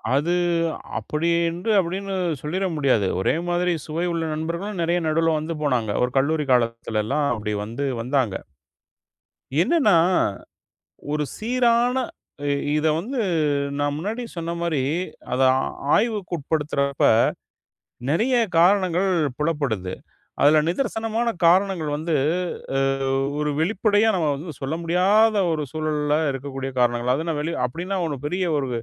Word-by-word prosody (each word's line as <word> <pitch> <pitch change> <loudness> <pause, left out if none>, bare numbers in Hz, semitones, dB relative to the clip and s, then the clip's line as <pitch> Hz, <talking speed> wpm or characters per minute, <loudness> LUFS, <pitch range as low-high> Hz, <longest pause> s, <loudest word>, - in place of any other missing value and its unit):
அது 155 +5 +1 0.6
அப்படி 155 +3 -1 0.2
என்று 175 +6 -2
அப்டினு 190 +2 -2 0.3
சொல்லிர 180 +6 -2
முடியாது. 130 -9 +2
ஒரே 95 - +1
மாதிரி 175 +1 +1
சுவை 165 +3 -2
உள்ள 165 -1 -1
நண்பர்களும் 170 +6 -4
நெறைய 170 +1 +1
நடுவுல 165 +1 +2
வந்து 160 +2 -4
போனாங்க. 125 -7 +1
ஒரு 125 - 0
கல்லூரி 150 +2 0
காலத்துலல்லாம், 115 +2 0
அப்டி 105 -1 -3
வந்து 115 +7 -4 0.2
வந்தாங்க. 125 -5 0 1.2
என்னன்னா, 275 - +3 1.2
ஒரு 150 0 0
சீரான 240 +1 +2 0.5
இ - - +2 0.3
இத 155 +1 +1
வந்து 240 +10 -3 0.6
நான் 145 0 0
முன்னாடி 215 +9 -3
சொன்ன 170 0 -3
மாரி, 165 -5 0 0.5
அத 125 - 0 0.2
ஆ - - 0 0.3
ஆய்வுக்கு 210 -5 0
உட்படுத்துறப்ப, 140 -2 0 1.0
நெறைய 225 - +2 0.2
காரணங்கள் 185 +1 +3 0.3
புலப்படுது. 140 - -1 0.5
அதுல 150 +2 +6
நிதர்சனமான 225 +2 -1 0.2
காரணங்கள் 180 -3 +3
வந்து, 160 +1 -1 0.6
அ - - +2 0.6
ஒரு 150 0 0
வெளிப்படையா 205 +5 +2
நம்ம 165 -4 +1
வந்து 155 +3 -7
சொல்ல 135 +4 -2
முடியாத 200 +6 +3 0.2
ஒரு 155 -2 -1
சூழல்ல 150 -1 0
இருக்கக்கூடிய 135 0 -5
காரணங்கள். 120 0 +2
அது 160 +4 -4
நான் 155 -2 -1
வெளிய 165 +3 -3
அப்டின்னா 180 +9 -4
ஒண்ணும் 145 -3 -5
பெரிய 180 +4 -1
ஒரு 135 -2 -2
160 Hz, 125 wpm, -23 LUFS, 140-185 Hz, 1.2 s, அதுல